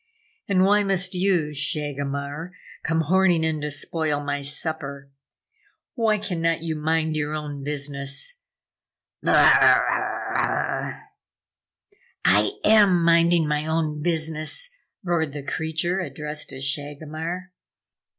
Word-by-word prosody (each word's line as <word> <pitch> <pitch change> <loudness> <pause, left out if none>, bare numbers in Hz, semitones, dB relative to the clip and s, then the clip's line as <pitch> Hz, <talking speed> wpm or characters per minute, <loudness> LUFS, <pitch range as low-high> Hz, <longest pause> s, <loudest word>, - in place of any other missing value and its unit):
And 190 -2 +3
why 205 +1 +4
must 190 -2 0
you, 180 -5 +1
Shagomar, 145 +2 -3 0.3
come 165 0 0
horning 175 0 +3
in 160 -1 -1
to 150 - -2
spoil 150 0 -1
my 145 0 -2
supper? 140 -1 -4 0.8
Why 225 -3 +2
cannot 165 -5 -1
you 160 -1 -2
mind 160 +1 0
your 150 0 -2
own 145 -2 -5
business, 145 - -2 0.8
Br - - -1
rrah!" - - +3 1.2
"I - - +4
am 200 -5 +5
minding 170 -1 +4
my 150 +1 -1
own 155 -2 -1
business," 160 - -2 0.3
roared 165 -5 0
the 145 -1 -6
creature 160 +5 -1
addressed 150 -4 -4
as 135 0 -7
Shagomar. 155 +6 -4
160 Hz, 110 wpm, -24 LUFS, 145-175 Hz, 1.2 s, am